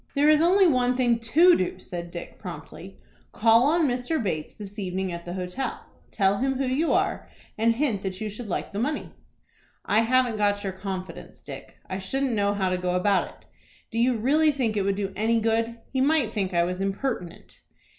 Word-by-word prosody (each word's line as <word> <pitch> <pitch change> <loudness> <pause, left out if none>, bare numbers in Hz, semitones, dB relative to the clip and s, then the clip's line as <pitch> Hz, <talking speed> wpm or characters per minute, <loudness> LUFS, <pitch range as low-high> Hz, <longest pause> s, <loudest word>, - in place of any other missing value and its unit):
"There 290 +2 +4
is 305 0 +5
only 375 +4 +5
one 250 -5 +2
thing 240 -2 +2
to 330 +10 +5
do," 185 - -1
said 175 -1 -7
Dick, 170 0 -9
promptly. 170 +2 -9 0.3
"Call 230 +3 +4
on 320 0 +3
Mr. 250 +5 -1
Bates 165 - -3
this 205 0 -9
evening 190 -1 -2
at 170 0 -7
the 175 - -5
hotel. 185 +8 -4 0.2
Tell 195 -1 +1
him 270 +1 0
who 270 - 0
you 275 +6 +1
are, - - 0 0.3
and 230 +1 +2
hint 240 -7 0
that 190 -1 -4
you 215 - -3
should 210 +1 -7
like - - -3
the 200 - -2
money." 295 +6 -2 0.7
"I 210 - +3
haven't 245 0 +2
got 205 -1 +1
your 195 -1 -3
confidence, 190 -1 -7
Dick. - - -10
I 185 - -4
shouldn't 265 +7 -1
know 205 -2 +1
how 190 -2 0
to 185 0 -1
go 180 0 -1
about 195 +1 +2
it. - - -17 0.5
Do 230 - -2
you 245 0 +3
really 300 +8 +3
think 245 -6 -1
it 205 - +1
would 195 0 0
do 195 -1 -3
any 225 +3 +2
good? 225 +1 0 0.2
He 260 - +1
might 275 -5 +2
think 195 -3 -1
I 170 -1 +2
was 180 +2 -3
impertinent." 195 -2 -4
220 Hz, 205 wpm, -25 LUFS, 190-255 Hz, 0.7 s, is